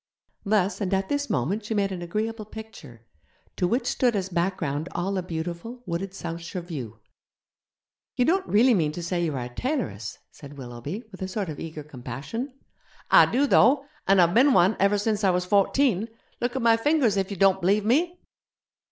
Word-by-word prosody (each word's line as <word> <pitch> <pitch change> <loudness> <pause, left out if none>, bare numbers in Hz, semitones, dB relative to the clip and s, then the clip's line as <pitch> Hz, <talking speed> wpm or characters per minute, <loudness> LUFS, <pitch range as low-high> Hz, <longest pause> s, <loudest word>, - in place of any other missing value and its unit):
Thus 205 -1 +1
and 195 -1 +1
at 190 0 -2
this 285 0 -1
moment 190 - -1
she 215 +1 -3
made 200 -1 +1
an 180 -2 -5
agreeable 215 +5 -3
picture, 200 - -11 0.5
to 180 - +1
which 240 +7 0
stood 245 -3 +1
as 190 -2 -2
background 170 -4 -1
all 185 +3 -1
the 190 - 0
beautiful, 175 +8 -6
wooded 185 +2 -3
Southshire 170 +1 -5
view. 130 - -7 1.2
'You 245 - +2
don't 375 +5 +1
really 240 +5 +5
mean 155 -7 +1
to 175 - -6
say 175 0 -1
you 155 -4 -1
are 125 - -3
a - - -7
tailoress?' 120 - -3
said 145 -1 -12
Willoughby, 130 - -6
with 190 - -12
a 190 - -2
sort 190 -1 -3
of 150 - -6
eager 155 -2 -6
compassion. 140 - -6 0.6
'I - - +8
do, 270 +4 +3
though! 275 +1 +4 0.2
An' 195 0 +5
I've 175 -1 +5
bin 265 +5 +5
one 190 +1 +4
ever 200 +1 +3
since 210 0 -1
I 195 - +4
was 180 0 +1
fourteen. 205 +2 +2 0.3
Look 245 +1 -2
at 260 - -1
my 230 -1 +5
fingers 260 -4 +2
if 195 -1 0
you 200 - -5
don't 190 +1 +4
b'lieve 200 +4 +2
me.' 335 +10 +2
195 Hz, 190 wpm, -25 LUFS, 170-225 Hz, 1.2 s, I